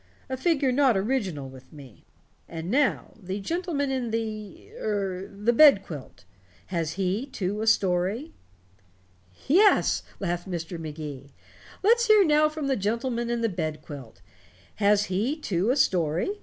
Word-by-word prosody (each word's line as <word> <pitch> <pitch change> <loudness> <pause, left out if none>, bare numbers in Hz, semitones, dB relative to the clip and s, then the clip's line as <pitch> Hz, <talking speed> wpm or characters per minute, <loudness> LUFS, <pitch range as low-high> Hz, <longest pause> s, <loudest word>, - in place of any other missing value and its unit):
A 260 - -2
figure 280 -2 +1
not 255 -4 +3
original 190 - -2
with 130 0 -14
me. 140 -7 -14 0.4
And 165 +2 -5
now 275 +1 +1
the 190 +2 -4
gentleman 315 - -2
in 255 -3 -2
the 215 -2 -5
er 195 -3 -2
the 210 +4 -1
bed 275 -6 +7
quilt. 130 - -10 0.5
Has 165 -2 -1
he, 195 +7 -1
too, 205 -4 -3
a 220 - -2
story?" 200 - +1 1.1
"Yes," 390 +9 +4 0.2
laughed 175 -1 -3
Mr. 170 -1 -5
Magee, 150 -3 -7 0.5
"let's 470 +3 +4
hear 425 -3 +6
now 305 -1 +4
from 305 -1 -5
the 275 -1 +1
gentleman 235 +3 -2
in 235 -1 -1
the 230 - +2
bed 155 -6 -4
quilt. 130 -9 -10 0.6
Has 205 0 +3
he, 210 +11 -1
too, 195 - -1
a 255 - +3
story? 185 - +1
205 Hz, 145 wpm, -26 LUFS, 175-270 Hz, 1.1 s, bed